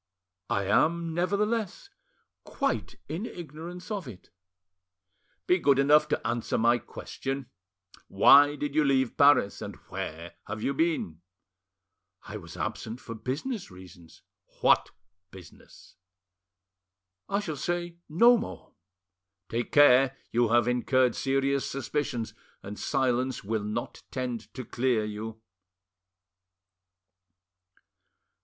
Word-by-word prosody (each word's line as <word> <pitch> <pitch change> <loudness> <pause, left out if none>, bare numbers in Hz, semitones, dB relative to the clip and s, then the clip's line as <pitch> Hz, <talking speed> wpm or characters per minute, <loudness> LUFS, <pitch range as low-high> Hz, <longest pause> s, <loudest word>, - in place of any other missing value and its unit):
"I 100 - 0
am, 160 - +1
nevertheless, 210 - -1 0.5
quite - - -2
in 180 +9 -4
ignorance 175 +4 -9
of 200 -8 -3
it." 105 -7 -12 1.1
"Be 180 - +3
good 140 -4 +4
enough 150 +2 +5
to 150 - -1
answer 120 -1 -1
my 120 +2 +3
question. 135 +3 -6 0.6
Why 145 +9 +6
did 145 -1 -4
you 155 0 +3
leave 130 -3 +1
Paris? 140 -8 +4
And - - -6
where 85 +2 -6
have 110 +1 -5
you 140 - 0
been?" 140 - -1 1.0
"I - - -7
was - - -11
absent 115 +3 -4
for 115 - -8
business 150 - -4
reasons." 90 -2 -15 0.4
"What - - +4 0.4
business?" 95 -1 -16 1.3
"I 200 - +1
shall 165 -7 -4
say 175 +3 -3
no 235 +10 +6
more." 230 - -8 0.8
"Take 120 +1 -3
care! 135 -2 +6
you 120 -1 +2
have 120 0 +3
incurred 125 0 +2
serious 135 0 0
suspicions, 135 -4 -3 0.3
and 100 0 -8
silence 130 0 0
will 110 +1 -2
not 105 +1 -4
tend 120 -5 -4
to 130 -1 -6
clear 120 -3 0
you." 110 +1 -7
130 Hz, 110 wpm, -28 LUFS, 115-155 Hz, 1.3 s, Why